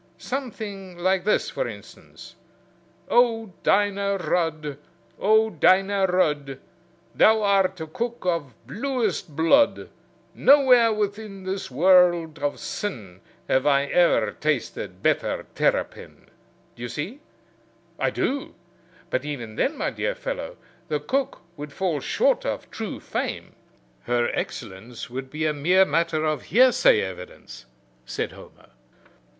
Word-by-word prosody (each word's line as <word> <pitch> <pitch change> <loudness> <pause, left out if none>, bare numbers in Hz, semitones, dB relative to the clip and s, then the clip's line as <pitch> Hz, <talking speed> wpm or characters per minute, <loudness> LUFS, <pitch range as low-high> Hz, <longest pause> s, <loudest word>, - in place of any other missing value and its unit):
Something 210 -8 -6
like 185 +1 +1
this, 210 - +1
for - - -2
instance: - - -12 0.7
Oh, 225 -4 +2
Dinah 200 0 +2
Rudd! 155 -5 -2 0.4
oh, 220 +2 +3
Dinah 195 0 +3
Rudd! 150 -7 0 0.6
Thou 220 0 +4
art 195 -2 +2
a 160 - -4
cook 235 +8 -5
of 165 - -1
bluest 210 - -2
blood! 165 - +3 0.4
Nowhere 255 -5 +5
within 205 -1 -3
This 190 +1 -4
world 170 +1 +4
of 145 0 -2
sin 105 - -6 0.3
Have 130 +2 +2
I 140 -1 +3
e'er 175 -1 +3
tasted 150 -4 -3
better - - 0
terrapin. - - -2 0.5
Do - - -14
you 120 - -4
see?" 165 - -5 0.8
"I - - +2
do; 280 +1 -2 0.6
but 130 - 0
even 130 -7 -6
then, 295 - 0
my - - -1
dear - - -2
fellow, - - -5 0.3
the 150 - -1
cook 260 - -2
would 150 -1 -8
fall 175 -2 -1
short - - +1
of - - -4
true - - -5
fame. - - -4 0.5
Her 120 -1 +1
excellence 115 +5 -6
would 130 +1 -6
be 155 +3 -3
a 155 - +1
mere 180 +6 +4
matter 165 -1 0
of 155 -4 -1
hearsay 245 - +5
evidence," 90 -9 -9 0.4
said - - -3
Homer. - - -16
180 Hz, 125 wpm, -24 LUFS, 145-215 Hz, 0.8 s, Nowhere